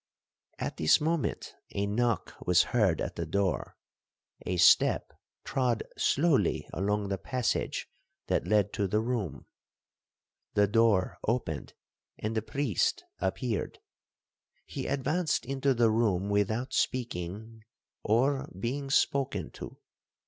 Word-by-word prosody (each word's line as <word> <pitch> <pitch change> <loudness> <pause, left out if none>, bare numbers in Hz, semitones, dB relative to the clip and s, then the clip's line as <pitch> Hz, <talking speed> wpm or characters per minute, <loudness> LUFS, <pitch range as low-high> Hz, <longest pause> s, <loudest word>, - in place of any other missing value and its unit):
'At - - -4
this 80 - +5
moment 160 0 -1 0.2
a 100 - +1
knock 115 +2 0
was 90 -1 +6
heard 100 -9 +3
at - - -4
the - - -2
door,—a 95 0 -4
step - - +5 0.3
trod 125 -4 0
slowly 140 - +2
along 100 +1 -1
the 100 -1 -2
passage 125 +6 -1 0.4
that - - 0
led 105 -1 +2
to 100 - 0
the 105 +3 +1
room,—the 105 - -5
door 110 -3 +2
opened, 105 -10 -2 0.4
and 110 +1 -3
the 110 - +1
priest 110 - 0 0.2
appeared. 105 +3 -2 0.9
He - - -5
advanced 150 +4 0
into 135 +1 +1
the 115 -2 +4
room 105 -4 +1
without 110 +5 0
speaking, 110 -2 -2 0.4
or 130 +5 +1
being 135 +6 -3
spoken 135 - +1
to. - - -9
110 Hz, 110 wpm, -29 LUFS, 100-130 Hz, 0.9 s, was